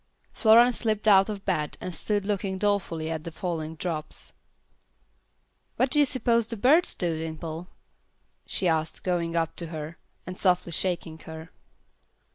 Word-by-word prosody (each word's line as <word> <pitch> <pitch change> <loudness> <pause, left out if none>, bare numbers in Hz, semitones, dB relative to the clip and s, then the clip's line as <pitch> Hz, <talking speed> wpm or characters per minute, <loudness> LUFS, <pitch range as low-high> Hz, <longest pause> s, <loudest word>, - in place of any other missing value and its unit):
Florence 235 +2 +6
slipped 220 -2 -1
out 195 0 +6
of 205 -2 -5
bed 155 -6 -1
and 180 - -5
stood 205 +5 -1
looking 195 -2 -1
dolefully 185 -6 -1
at 160 -1 -4
the 170 - -5
falling 160 -1 -4
drops. 160 -2 -5 1.4
"What 255 0 +1
do 295 - +2
you 290 - +6
suppose 235 -4 +1
the 230 - -4
birds 300 - +4
do, 165 -3 -1
Dimple?" 160 +1 -5 0.8
she 185 - +1
asked, 160 -1 -1
going 170 -2 -1
up 165 -1 0
to 170 - -4
her, 155 0 -7 0.3
and 185 +1 -7
softly 180 -2 +2
shaking 170 -2 -1
her. 160 +1 -10
180 Hz, 150 wpm, -27 LUFS, 160-205 Hz, 1.4 s, Florence